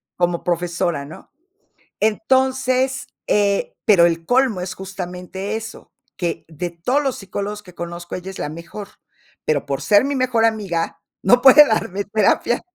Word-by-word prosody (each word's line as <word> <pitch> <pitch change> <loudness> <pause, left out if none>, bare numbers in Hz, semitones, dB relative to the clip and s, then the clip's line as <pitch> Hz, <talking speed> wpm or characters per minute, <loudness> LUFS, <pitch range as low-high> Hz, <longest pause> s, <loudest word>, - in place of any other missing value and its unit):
como 175 -1 0
profesora, 175 -3 -1
¿no? 155 - -13 0.7
Entonces, 260 +2 +1 0.2
eh, 200 -1 +1
pero 190 -6 +6
el 165 -1 0
colmo 245 -2 +2
es 180 0 -4
justamente 190 +1 -6
eso, 225 0 -8 0.2
que 175 -2 -2
de 170 +2 -5
todos 245 +13 0
los 270 -3 -1
psicólogos 205 +2 -5
que 180 - -14
conozco, 175 0 -6
ella 185 +1 -6
es 190 - -10
la - - -3
mejor, 170 +6 -8 0.6
pero 150 -2 0
por 140 - -3
ser 205 +1 +4
mi 280 +1 -1
mejor 255 -3 +1
amiga, 200 -7 -1 0.2
no 245 +6 +4
puede 275 +3 +9
darme 200 -5 -1
terapia. 215 +3 +1
195 Hz, 150 wpm, -20 LUFS, 175-235 Hz, 0.7 s, puede